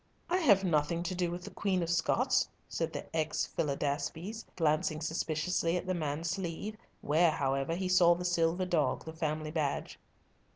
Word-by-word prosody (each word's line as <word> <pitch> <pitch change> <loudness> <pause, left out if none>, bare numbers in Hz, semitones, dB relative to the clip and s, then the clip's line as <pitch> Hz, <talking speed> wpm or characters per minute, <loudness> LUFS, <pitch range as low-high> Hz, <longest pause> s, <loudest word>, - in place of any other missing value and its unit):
"I 360 - +4
have 205 - +5
nothing 170 -1 +1
to 185 - -2
do 180 -1 0
with 175 +1 -5
the 205 - -8
Queen 185 -1 0
of 165 - -3
Scots," 170 -2 +2 0.2
said - - -2
the - - -5
ex 155 -1 0
Philidaspes, 150 +8 -2
glancing 155 -1 +1
suspiciously 165 +2 0
at 180 - -4
the 185 - 0
man's 160 0 -2
sleeve, 190 +3 -4 0.3
where, 160 +4 +4
however, 135 +1 0
he 185 +1 -2
saw 175 -2 +6
the 180 +1 -5
silver 175 +1 +2
dog, 170 -4 0
the 160 - -6
family 155 -1 -2
badge. 150 -3 -2
170 Hz, 170 wpm, -32 LUFS, 155-180 Hz, 0.3 s, saw